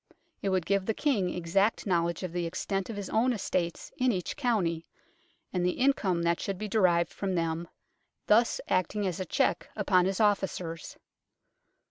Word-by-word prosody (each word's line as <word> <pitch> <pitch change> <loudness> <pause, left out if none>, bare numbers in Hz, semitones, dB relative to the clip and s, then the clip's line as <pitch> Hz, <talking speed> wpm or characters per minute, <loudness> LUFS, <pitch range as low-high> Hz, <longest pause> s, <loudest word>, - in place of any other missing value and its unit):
It 200 - 0
would 185 -3 +1
give 195 -1 +1
the 220 - 0
King 220 -12 +1
exact 190 +5 +1
knowledge 170 -2 0
of 180 -2 -4
the 175 -1 -1
extent 190 +3 -3
of 225 - -4
his 200 -2 -5
own 245 +3 +3
estates 180 -5 -2
in 255 0 +3
each 180 -5 -3
county, 195 - 0 0.7
and 180 -1 0
the 180 0 +2
income 200 -10 +2
that 170 0 +1
should 195 -2 -3
be 215 - -4
derived 180 -5 +2
from 190 -2 -2
them, 165 0 -1 0.6
thus 230 +3 +4
acting 190 +3 0
as 185 -2 -2
a 185 - -2
check 175 - 0
upon 190 -4 +3
his 190 0 -1
officers; 190 -6 0
2. - - -28
185 Hz, 175 wpm, -29 LUFS, 170-205 Hz, 0.7 s, thus